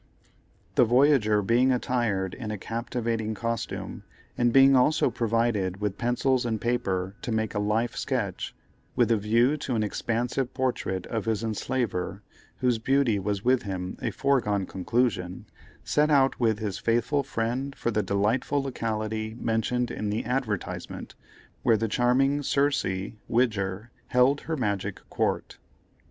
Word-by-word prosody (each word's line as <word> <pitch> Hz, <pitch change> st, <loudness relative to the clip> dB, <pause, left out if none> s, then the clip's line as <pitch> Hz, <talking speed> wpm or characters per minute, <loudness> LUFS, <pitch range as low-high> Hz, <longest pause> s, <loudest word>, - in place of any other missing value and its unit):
The -, -, +5 dB
voyager 120 Hz, -4 st, +4 dB
being 120 Hz, +5 st, +3 dB
attired 120 Hz, -7 st, 0 dB
in 115 Hz, -4 st, -6 dB
a 105 Hz, -, -3 dB
captivating 115 Hz, 0 st, -3 dB
costume, 115 Hz, +1 st, -4 dB, 0.3 s
and 120 Hz, -1 st, +2 dB
being 135 Hz, +1 st, +7 dB
also 130 Hz, +4 st, +3 dB
provided 110 Hz, -5 st, 0 dB
with 105 Hz, -2 st, -2 dB
pencils 125 Hz, +2 st, +1 dB
and 115 Hz, -2 st, -1 dB
paper 95 Hz, -6 st, -1 dB
to 120 Hz, -, -4 dB
make 110 Hz, -1 st, -1 dB
a 105 Hz, -, -1 dB
life 110 Hz, +3 st, 0 dB
sketch, 115 Hz, -9 st, -2 dB, 0.4 s
with -, -, +3 dB
a -, -, +5 dB
view 115 Hz, +7 st, +2 dB
to 130 Hz, -4 st, -3 dB
an 110 Hz, -, +1 dB
expansive 120 Hz, +4 st, -2 dB
portrait 125 Hz, -8 st, -1 dB
of 110 Hz, -3 st, -3 dB
his 110 Hz, -1 st, 0 dB
enslaver, 110 Hz, -3 st, -2 dB, 0.4 s
whose 125 Hz, -3 st, +2 dB
beauty 130 Hz, -3 st, +2 dB
was 100 Hz, +1 st, -2 dB
with 125 Hz, 0 st, +4 dB
him 95 Hz, -4 st, -4 dB
a -, -, 0 dB
foregone 110 Hz, -8 st, +1 dB
conclusion, 95 Hz, -2 st, -1 dB, 0.4 s
set 150 Hz, +1 st, +2 dB
out 135 Hz, -2 st, +3 dB
with 110 Hz, -3 st, +2 dB
his 105 Hz, -2 st, -3 dB
faithful 120 Hz, +6 st, +1 dB
friend 130 Hz, +2 st, -2 dB
for 120 Hz, -, -1 dB
the 105 Hz, -, +1 dB
delightful 110 Hz, +8 st, 0 dB
locality 110 Hz, -3 st, -3 dB
mentioned 120 Hz, +2 st, 0 dB
in 105 Hz, -, -3 dB
the 105 Hz, +2 st, -2 dB
advertisement, 125 Hz, -7 st, -3 dB, 0.5 s
where 115 Hz, -, +4 dB
the 115 Hz, +2 st, -1 dB
charming 130 Hz, +6 st, +2 dB
Circe, 135 Hz, -10 st, 0 dB, 0.2 s
Widger, 110 Hz, -2 st, 0 dB, 0.2 s
held 130 Hz, +3 st, +3 dB
her 160 Hz, -1 st, -3 dB
magic 100 Hz, -5 st, -2 dB
court. -, -, -1 dB
115 Hz, 145 wpm, -27 LUFS, 105-125 Hz, 0.5 s, being